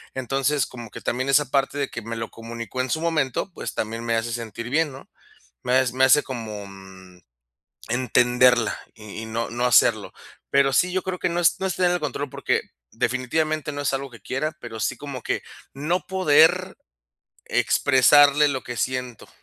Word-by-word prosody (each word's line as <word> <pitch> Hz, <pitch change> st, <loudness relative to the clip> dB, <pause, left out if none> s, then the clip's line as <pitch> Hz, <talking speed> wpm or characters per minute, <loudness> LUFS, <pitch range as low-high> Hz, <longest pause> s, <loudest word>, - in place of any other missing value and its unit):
Entonces, 135 Hz, +2 st, 0 dB
como 120 Hz, -3 st, -10 dB
que -, -, -9 dB
también 130 Hz, +3 st, -2 dB
esa 145 Hz, +1 st, +4 dB
parte 140 Hz, +1 st, +1 dB
de 140 Hz, -, -1 dB
que 120 Hz, -, -6 dB
me 115 Hz, +1 st, -6 dB
lo 115 Hz, 0 st, -5 dB
comunicó 115 Hz, +2 st, -6 dB
en 130 Hz, -, -3 dB
su 160 Hz, -, 0 dB
momento, 160 Hz, -1 st, -1 dB
pues, -, -, -6 dB
también 115 Hz, +2 st, -3 dB
me 115 Hz, -1 st, 0 dB
hace 115 Hz, +1 st, -2 dB
sentir 115 Hz, 0 st, -6 dB
bien, 160 Hz, 0 st, +1 dB
¿no? 135 Hz, +1 st, -12 dB, 0.6 s
Me 125 Hz, -, -1 dB
has 130 Hz, -1 st, +3 dB
me 130 Hz, +1 st, +1 dB
hace 145 Hz, +3 st, +6 dB
como, 110 Hz, -5 st, -6 dB
mm, 95 Hz, -2 st, -14 dB, 0.7 s
entenderla, 125 Hz, 0 st, +3 dB, 0.2 s
y 105 Hz, 0 st, -9 dB
y -, -, -6 dB
no 115 Hz, +1 st, -3 dB
no 120 Hz, +1 st, -2 dB
hacerlo. 125 Hz, -, +4 dB, 0.4 s
Pero 140 Hz, 0 st, +3 dB
sí, 180 Hz, +7 st, +3 dB
yo 185 Hz, 0 st, -1 dB
creo 185 Hz, -1 st, -4 dB
que -, -, 0 dB
no 175 Hz, 0 st, -1 dB
es 170 Hz, -, +3 dB
no 190 Hz, -, -2 dB
es 185 Hz, -, -3 dB
tener 180 Hz, -1 st, +3 dB
el 180 Hz, -, 0 dB
control, 145 Hz, -1 st, -3 dB
porque, -, -, -1 dB, 0.3 s
definitivamente, 150 Hz, +6 st, -1 dB
no 145 Hz, 0 st, -5 dB
es 140 Hz, -, 0 dB
algo 135 Hz, 0 st, -3 dB
que 115 Hz, -, -13 dB
quiera, 150 Hz, +7 st, -2 dB
pero 115 Hz, -2 st, -8 dB
sí -, -, -1 dB
como 140 Hz, -4 st, -7 dB
que -, -, -2 dB, 0.3 s
no 160 Hz, +6 st, -2 dB
poder 180 Hz, +1 st, +3 dB, 0.7 s
expresarle 145 Hz, +2 st, +4 dB
lo 135 Hz, -2 st, -3 dB
que 120 Hz, -, -6 dB
siento. 125 Hz, -1 st, -3 dB
130 Hz, 190 wpm, -23 LUFS, 115-150 Hz, 0.7 s, hace